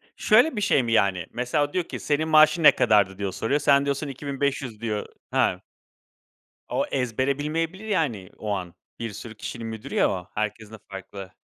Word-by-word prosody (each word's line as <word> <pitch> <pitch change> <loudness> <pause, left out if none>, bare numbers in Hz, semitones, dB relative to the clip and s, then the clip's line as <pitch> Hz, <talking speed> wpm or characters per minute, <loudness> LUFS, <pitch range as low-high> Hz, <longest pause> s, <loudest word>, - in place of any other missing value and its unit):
Şöyle 245 +7 +4
bir 210 - -2
şey 200 -10 +3
mi, 115 - -2
yani? 95 -6 +2
Mesela, 125 +5 0
o 145 - -11
diyor 180 - +1
ki, - - -7
"Senin 155 +1 0
maaşın 155 +1 +5
ne - - +10
kadardı?" 100 -4 +3
diye 100 -1 -2
soruyor. 125 +9 0
Sen 140 -1 +4
diyorsun, 140 +1 -1
"2.500" 135 -4 -3
diyor 105 -3 -2 0.3
Ha. - - +1 1.1
O - - 0
ezbere 130 +2 0
bilmeyebilir 165 +7 -2
yani 130 - -1
o 105 - -6
an, 90 -4 -4 0.2
bir 115 -2 -4
sürü 110 +2 -9
kişinin 115 +1 -6
müdürü 110 +5 -7
ya - - +4
o, 90 -1 -5
herkesin 105 0 -3
de - - -8
farklı. 95 0 -8
125 Hz, 185 wpm, -25 LUFS, 105-150 Hz, 1.1 s, ne